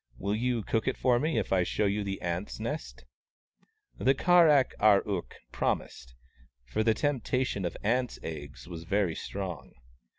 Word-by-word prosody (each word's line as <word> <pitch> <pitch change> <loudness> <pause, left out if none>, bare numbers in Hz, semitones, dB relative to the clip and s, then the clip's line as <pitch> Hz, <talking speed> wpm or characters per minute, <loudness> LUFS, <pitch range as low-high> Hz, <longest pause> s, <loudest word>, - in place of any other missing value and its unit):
Will 100 +7 -2
you 120 0 0
cook 110 +3 -1
it 130 - 0
for 125 -2 +3
me, 155 -2 0
if 100 -3 0
I 95 - +4
show 105 +4 0
you 100 +1 0
the 100 -1 -4
ants' 90 +4 -3
nest? 145 +8 -5 0.5
" 435 -2 -39
The 135 +1 +3
Kar 175 +1 +5
ak 140 -3 +4
ar 105 -2 +5
ook 95 -4 -3 0.2
promised, 60 0 -3 0.5
for 105 - -1
the 110 0 +3
tempta 130 -1 0
tion 100 -6 -3
of 85 - -2
the - - -12
ants' 125 +2 +1
eggs 75 -2 -7
was 85 -2 -7
very 100 -2 +1
strong. 90 -5 -6
105 Hz, 185 wpm, -29 LUFS, 90-130 Hz, 0.5 s, Kar